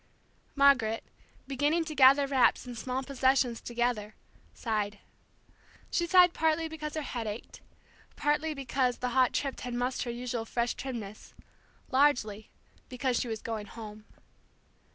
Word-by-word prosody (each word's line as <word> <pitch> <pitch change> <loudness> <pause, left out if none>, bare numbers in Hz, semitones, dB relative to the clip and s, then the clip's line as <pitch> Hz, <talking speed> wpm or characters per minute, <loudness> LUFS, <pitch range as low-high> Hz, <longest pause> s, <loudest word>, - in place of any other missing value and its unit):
Margaret, 265 -6 +4 0.4
beginning 290 +5 +1
to 310 - -5
gather 275 0 +6
wraps 270 -2 +3
and 245 -1 -7
small 255 +3 -3
possessions 260 -3 +1
together, 240 -3 -2 0.4
sighed. 210 -3 -2 0.9
She 345 - 0
sighed 360 -1 +6
partly 320 0 +1
because 310 -1 -6
her 310 - -2
head 235 -5 -4
ached, 210 +2 -7 0.5
partly 300 +1 0
because 255 -2 0
the 250 - -2
hot 255 0 +3
trip 275 -2 -2
had 245 -1 -5
mussed 250 +2 -1
her 245 - -3
usual 240 -1 -4
fresh 235 +1 -1
trimness, 225 -6 -7 0.6
largely 245 -7 +2 0.4
because 250 -1 -1
she - - -2
was 220 -1 -5
going 220 -2 -4
home. 215 -1 -10
250 Hz, 135 wpm, -30 LUFS, 230-280 Hz, 0.9 s, gather